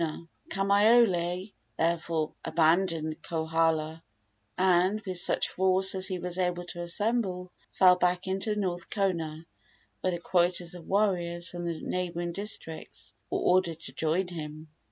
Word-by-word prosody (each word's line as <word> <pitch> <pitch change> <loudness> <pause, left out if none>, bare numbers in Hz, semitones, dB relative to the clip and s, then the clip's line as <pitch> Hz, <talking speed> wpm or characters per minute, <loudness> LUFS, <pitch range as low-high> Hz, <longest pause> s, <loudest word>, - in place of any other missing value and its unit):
Kamaiole 195 -2 +3 0.2
therefore 165 -1 0
abandoned 160 -1 +1
Kohala, 160 -1 0 0.6
and, 185 +2 +3
with 185 -4 -3
such - - +2
force 190 +1 +3
as 190 0 +1
he 185 -2 -2
was 180 +1 -4
able 180 -1 0
to 175 - -6
assemble, 185 0 -1 0.2
fell 180 -1 +5
back 180 0 +1
into 195 +3 0
North 180 -4 -2
Kona, 165 -6 -2 0.5
where 185 - 0
the 175 - -1
quotas 175 0 +1
of 175 -2 -10
warriors 180 -4 0
from 175 -1 -6
the 165 -2 -3
neighboring 175 -1 -2
districts 185 -4 -5 0.2
were - - -1
ordered 180 -3 +2
to - - -7
join 165 +4 0
him. 155 -2 -7
180 Hz, 135 wpm, -28 LUFS, 165-190 Hz, 0.6 s, fell